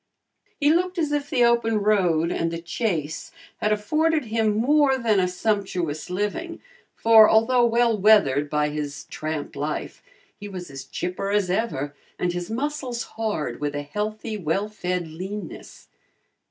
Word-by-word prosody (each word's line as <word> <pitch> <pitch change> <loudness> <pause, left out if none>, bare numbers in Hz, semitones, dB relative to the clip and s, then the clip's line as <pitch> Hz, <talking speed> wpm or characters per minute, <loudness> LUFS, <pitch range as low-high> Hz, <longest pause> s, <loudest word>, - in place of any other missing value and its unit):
He 295 +1 +4
looked 360 +2 0
as 310 -3 0
if 290 -1 -1
the 245 - +3
open 235 -2 +2
road 180 -6 +2
and 165 - 0
the 165 - -4
chase 165 -3 -3 0.3
had 210 - 0
afforded 305 +8 +1
him 220 -1 +1
more 275 +3 +3
than 225 -5 +2
a 180 - +2
sumptuous 180 -5 -2
living, 210 - -3 0.4
for 225 -1 +7
although 240 +3 +4
well 235 0 +3
weathered 185 -9 +4
by 150 0 +1
his 150 -1 -5
tramp 155 -2 -4
life, 150 +2 -4 0.4
he 205 - -7
was 180 -5 -8
as 135 -1 -8
chipper 180 +6 -4
as 200 -3 +1
ever 180 -9 -1 0.2
and 175 -1 -1
his 175 0 -4
muscles 255 0 -3
hard 215 -8 -3
with 145 0 -2
a 145 - -3
healthy 215 +7 -4
well 195 +4 -1
fed 180 -4 -3
leanness. 185 +3 -8
210 Hz, 155 wpm, -24 LUFS, 165-230 Hz, 0.4 s, for